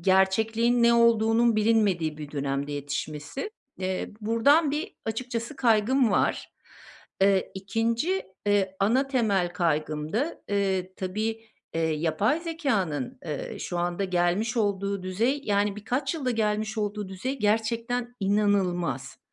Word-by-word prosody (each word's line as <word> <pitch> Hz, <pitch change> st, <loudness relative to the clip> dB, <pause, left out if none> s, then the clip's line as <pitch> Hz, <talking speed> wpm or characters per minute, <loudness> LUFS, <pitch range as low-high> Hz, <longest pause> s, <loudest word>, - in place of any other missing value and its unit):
gerçekliğin 220 Hz, +6 st, +3 dB
ne 235 Hz, 0 st, +6 dB
olduğunun 230 Hz, 0 st, +4 dB
bilinmediği 200 Hz, -8 st, +2 dB
bir 150 Hz, -1 st, -7 dB
dönemde 140 Hz, 0 st, -2 dB
yetişmesi. 145 Hz, -, -4 dB, 0.3 s
Eee, 185 Hz, 0 st, -2 dB
buradan 275 Hz, +8 st, +4 dB
bir 305 Hz, +8 st, -3 dB
açıkçası 235 Hz, +3 st, -4 dB
kaygım 235 Hz, +1 st, +3 dB
var. -, -, 0 dB, 0.7 s
Eee, 195 Hz, -1 st, +3 dB
2’nci, 230 Hz, -, 0 dB, 0.2 s
eee, 195 Hz, -2 st, +2 dB
ana 255 Hz, +7 st, +2 dB
temel 200 Hz, -9 st, +1 dB
kaygım 155 Hz, -3 st, -1 dB
da, 280 Hz, +10 st, -1 dB
eee, 190 Hz, -2 st, 0 dB
tabii, 220 Hz, +4 st, -3 dB, 0.3 s
eee, 165 Hz, -, 0 dB
yapay 160 Hz, -, +1 dB
zekânın, 220 Hz, -, -2 dB
eee, 150 Hz, -4 st, -5 dB
şu 175 Hz, -, -4 dB
anda 175 Hz, +2 st, -1 dB
gelmiş 185 Hz, +5 st, 0 dB
olduğu 200 Hz, -2 st, 0 dB
düzey 230 Hz, +10 st, 0 dB
yani, 205 Hz, 0 st, +1 dB
birkaç 255 Hz, +8 st, -2 dB
yılda 270 Hz, -6 st, -1 dB
gelmiş 215 Hz, 0 st, -1 dB
olduğu 210 Hz, -1 st, -2 dB
düzey 255 Hz, +9 st, -4 dB
gerçekten 230 Hz, +3 st, 0 dB
inanılmaz. 190 Hz, -9 st, 0 dB
210 Hz, 120 wpm, -27 LUFS, 185-235 Hz, 0.7 s, ne